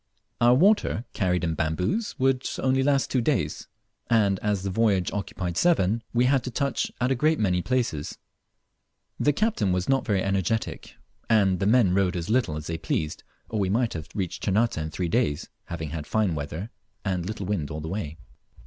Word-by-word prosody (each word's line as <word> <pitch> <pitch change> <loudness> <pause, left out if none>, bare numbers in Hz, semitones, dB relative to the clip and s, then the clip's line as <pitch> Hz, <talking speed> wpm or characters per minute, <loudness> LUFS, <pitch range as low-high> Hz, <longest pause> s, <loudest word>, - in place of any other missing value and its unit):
Our 120 +1 +6
water, 185 - +3
carried 90 -3 0
in 80 -2 0
bamboos, 90 - -1
would 130 0 +1
only 130 0 +2
last 140 0 +2
two 130 - +2
days, 115 - -1 0.4
and 100 -5 +3
as 105 -3 -1
the 95 - -2
voyage 100 -3 +2
occupied 90 -3 -3
seven, 115 - +3
we 120 +1 +3
had 130 -1 +3
to - - -2
touch 140 +3 -1
at 125 +1 +1
a - - +3
great 155 +5 +2
many 90 -4 +2
places. 115 - -1 1.0
The 145 - +4
captain 145 - +1
was 90 0 0
not 135 -1 +2
very 100 -5 0
energetic, 100 +3 -2 0.3
and 100 -5 +3
the 95 - +1
men 110 -5 +4
rowed 95 -1 +2
as 85 +3 -3
little 120 -11 +2
as 75 - -6
they 80 0 -4
pleased, 75 0 -2 0.2
or 110 - -3
we 95 -2 +1
might 115 +3 +1
have 80 0 -6
reached 95 -4 -3
Ternate 110 +4 +1
in 80 0 -3
three 90 +3 -2
days, 85 - 0 0.2
having 80 -3 -5
had 80 -2 -5
fine 110 -5 +1
weather 80 +8 -5 0.3
and 90 -3 -1
little 105 -2 -4
wind 90 -7 -2
all 75 - -5
the 80 - -6
way. 80 -4 -4
100 Hz, 190 wpm, -26 LUFS, 90-125 Hz, 1.0 s, Our